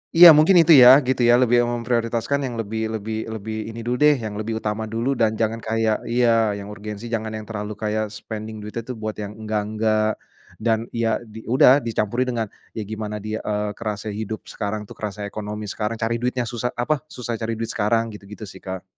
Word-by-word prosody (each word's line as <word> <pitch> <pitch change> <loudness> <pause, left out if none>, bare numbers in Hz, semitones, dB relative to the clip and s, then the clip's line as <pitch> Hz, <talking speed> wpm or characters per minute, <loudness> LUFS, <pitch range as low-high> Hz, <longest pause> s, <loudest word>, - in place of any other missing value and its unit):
Iya, 170 -2 +11
mungkin 165 +5 +6
itu 165 -1 +7
ya, 130 +1 +10
gitu 130 -1 +1
ya 120 +1 +6
lebih 120 -1 +4
memprioritaskan 120 +3 -1
yang 120 -3 -4
lebih 110 0 -3
lebih 110 +1 -4
lebih 110 0 -5
ini 115 - -8
dulu 120 +2 -2
deh 150 -2 +5
yang 110 -2 -5
lebih 110 +1 -3
utama 110 0 -2
dulu, 115 +5 -1
dan 110 -2 +1
jangan 115 0 -1
kayak 110 -1 0
iya 115 -2 +2
yang 100 0 -6
urgensi 105 +2 -7
jangan 110 -2 -3
yang 110 -1 -6
terlalu 105 -1 -5
kayak 110 -1 -1
spending 110 0 -7
duitnya 105 +2 -6
itu 130 - -7
buat 110 -3 -5
yang 105 -1 -6
enggak-enggak, 110 0 0 0.4
dan 110 0 +1
ya 115 -1 0
di 110 -1 -12
udah 130 +3 +6
dicampurin 120 0 -1
dengan 115 -3 -1 0.3
ya 110 - -3
gimana 105 0 -5
dia, 110 +1 -3
eee, 105 0 -2
kerasa 105 0 -4
hidup 110 +1 -5
sekarang 105 0 -3
tuh, 105 - -13
kerasa 105 -1 -5
ekonomi 105 +1 -5
sekarang 105 +1 -2
cari 115 +1 -1
duitnya 125 +1 -1
susah, 120 +1 -4
apa, 145 +5 0
susah 120 -5 -5
cari 115 0 -2
duit 115 0 -4
sekarang 115 +1 0
gitu-gitu 105 +1 -10
sih 100 - -10
Kak. 95 -1 -6
110 Hz, 200 wpm, -22 LUFS, 105-120 Hz, 0.4 s, Iya